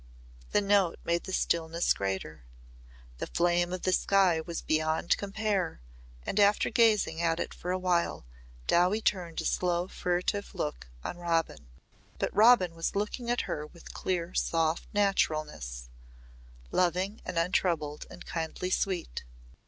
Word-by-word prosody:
The - - +3
note 200 -4 +3
made 170 0 0
the 190 - -5
stillness 170 -1 +1
greater. 95 -7 -4 0.8
The - - -3
flame 175 0 +1
of 185 -1 -4
the 185 - +2
sky 185 -5 +3
was 170 0 -5
beyond 155 +1 +1
compare 200 - -1 0.5
and, 200 - -1
after 205 0 +4
gazing 215 -8 +3
at 165 0 +1
it - - -3
for 180 - -7
a 185 - +1
while, 180 - 0 0.4
Dowie 180 - +3
turned 175 -4 0
a - - -6
slow 175 0 +1
furtive 180 +3 -2
look 150 - -3 0.2
on 175 - -5
Robin. 165 - -1 0.5
But - - -2
Robin 210 -5 +6
was 165 +3 -3
looking 210 +4 -2
at 240 - +2
her 150 0 -4
with 170 +2 -13
clear 180 -1 -2
soft 165 -1 +1
naturalness 155 - 0 0.8
loving 185 +4 +1
and 170 - -5
untroubled 165 -3 0
and 180 - -11
kindly 165 +2 -3
sweet. 180 - -1
175 Hz, 140 wpm, -30 LUFS, 165-195 Hz, 0.8 s, Robin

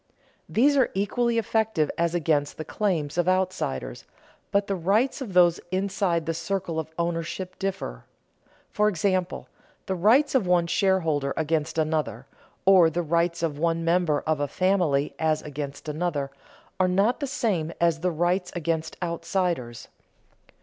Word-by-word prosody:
These 280 +5 +3
are 260 - +4
equally 230 +4 0
effective 220 -8 +1
as 170 +1 0
against 150 -4 0
the 155 - -5
claims 170 -7 -1
of 175 - +1
outsiders, 180 - -1 0.5
but 200 0 +2
the 200 - -2
rights 205 +11 +1
of 220 -8 -5
those 175 -2 +5
inside 185 -3 0
the 165 - -1
circle 170 -1 -3
of 160 -1 -5
ownership 170 +2 -3
differ. 185 - -4 0.7
For 210 0 +2
example, 185 -1 -1 0.4
the 190 - -2
rights 225 - +4
of 245 -9 +2
one 175 -1 +3
shareholder 165 -5 +1
against 160 0 -1
another, 155 -5 -1 0.4
or 185 -4 +7
the 175 +2 -2
rights 170 +1 0
of 150 -3 -1
one 165 0 0
member 170 -3 +2
of 155 -2 -1
a 145 - 0
family 175 -6 +1
as 155 -1 +1
against 145 0 -6
another, 150 -3 -2 0.5
are 185 - +4
not 200 +7 +2
the 285 - -2
same 195 - -1
as 170 -1 +2
the 180 +2 0
rights 180 +2 0
against 165 -1 -2
outsiders. 170 -7 -2
170 Hz, 150 wpm, -25 LUFS, 160-190 Hz, 0.7 s, or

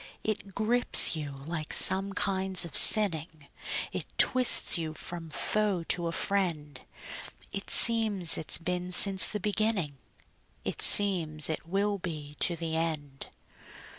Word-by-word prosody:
It 210 -3 -6
grips 235 -4 +2
you 150 -2 -7
like 150 +3 -9
some 195 +1 +3
kinds 190 -2 -1
of 170 - -11
sinning; 160 -8 +4 0.4
It - - -8
twists 255 -1 +5
you 160 -2 -5
from 170 -1 -8
foe 205 +2 -3
to 175 -1 -2
a - - -5
friend; 165 -8 -4 0.7
It 195 - -7
seems 215 -7 +2
it's 155 - 0
been 180 +1 -6
since 190 +1 +3
the 210 - -7
beginning; 205 -8 -4 0.7
It - - -6
seems 165 -7 +4
it 160 - -8
will 200 +3 -3
be 155 -5 -9
to 170 - -2
the 165 -1 -6
end. 155 -4 -6
175 Hz, 135 wpm, -26 LUFS, 160-200 Hz, 0.7 s, twists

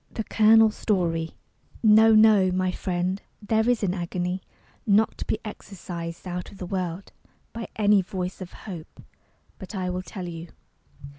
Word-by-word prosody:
THE 225 - -4
COLONEL'S 220 0 +5
STORY 165 -5 -1 0.5
No, 220 0 +7
no, 215 -3 +6
my 185 0 0
friend; 185 +1 -2 0.2
there 220 +2 +1
is 245 -3 +1
an 185 -2 +1
agony 180 0 -3 0.5
Not 210 +2 +3
to - - -4
be - - -1
exorcised 175 -5 -7
out 180 0 -5
of 200 - -13
the 185 - -6
world 180 0 -4 0.4
By 230 -1 -5
any 205 -2 +4
voice 185 -1 -5
of 185 - -7
hope. 175 -7 -9 0.6
But, 190 +1 -9
I 185 -1 -2
will 180 0 -3
tell 185 -1 -7
you. 165 0 -7
190 Hz, 155 wpm, -25 LUFS, 180-215 Hz, 0.6 s, No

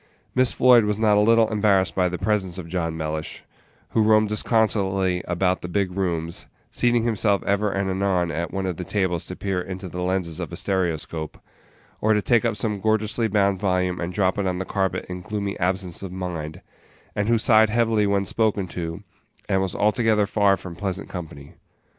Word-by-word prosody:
Miss 130 -1 +3
Floyd 125 -3 +5
was 105 -1 0
not 110 -1 +3
a - - +4
little 115 +1 +4
embarrassed 100 -3 +2
by 90 -1 +1
the 90 - -4
presence 95 -3 -1
of 90 -3 -7
John 80 -2 -2
Mellish, 80 0 -4 0.5
who 110 - +1
roamed 110 0 +4
disconsolately 95 -4 +1
about 90 +1 0
the - - -5
big 95 +1 -1
rooms, 85 -3 -2 0.2
seating 120 -1 +2
himself 105 -3 +1
ever 100 +1 +1
and 95 0 -1
anon 95 -2 0
at 85 +1 -3
one 95 0 -3
of 90 -3 -3
the 90 - -4
tables 90 -3 -1
to 90 - -6
peer 95 -2 -2
into 95 +1 -6
the 90 +1 -6
lenses 90 -3 -1
of - - -5
a - - -5
stereoscope, 85 -4 -2 0.6
or 110 +1 +3
to 105 - +1
take 120 -3 +3
up - - +1
some 105 -2 -2
gorgeously 110 +1 +1
bound 100 -2 +1
volume 90 -2 0
and 85 +1 -3
drop 95 +1 0
it 100 - 0
on 90 -1 -1
the 95 - -3
carpet 95 -1 -1
in 90 0 -6
gloomy 100 0 -3
absence 90 -1 -1
of 95 -2 -6
mind, 85 -4 -5 0.5
and 105 0 0
who 115 0 +3
sighed 110 -1 +4
heavily 110 -2 +2
when 100 -1 +1
spoken 105 -3 0
to, 85 +3 -5 0.4
and 95 - +1
was 95 -2 -2
altogether 105 0 +2
far 100 -1 +2
from 90 -1 -9
pleasant 95 0 -4
company. 80 -4 -8
95 Hz, 195 wpm, -23 LUFS, 90-105 Hz, 0.6 s, Floyd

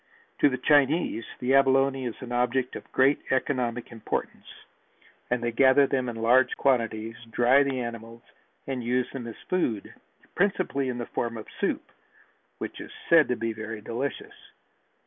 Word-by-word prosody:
To 145 - +5
the 130 - -2
Chinese 145 -4 +2
the 125 +2 0
abalone 135 -1 +3
is 120 - -4
an 120 - -8
object 125 +1 0
of - - -9
great 135 +2 +3
economic 125 -3 -1
importance 115 -1 -4 0.8
and 120 -1 0
they 120 - 0
gather 130 +3 +5
them 130 -2 -1
in 120 - -6
large 120 +3 +3
quantities, 115 -4 0
dry 125 +4 +4
the 135 -2 0
animals 115 -1 -7 0.4
and 130 -3 -4
use 125 +1 0
them 125 -3 -6
as 115 - -7
food, 120 - -1 0.4
principally 180 -8 0
in 125 - -3
the 120 - -4
form 115 0 -3
of 110 - -8
soup, - - -2 0.7
which - - -6
is - - -10 0.2
said 165 -2 +6
to 125 - 0
be 115 0 -3
very 110 0 -6
delicious. 120 +5 -4
125 Hz, 160 wpm, -27 LUFS, 115-135 Hz, 0.8 s, said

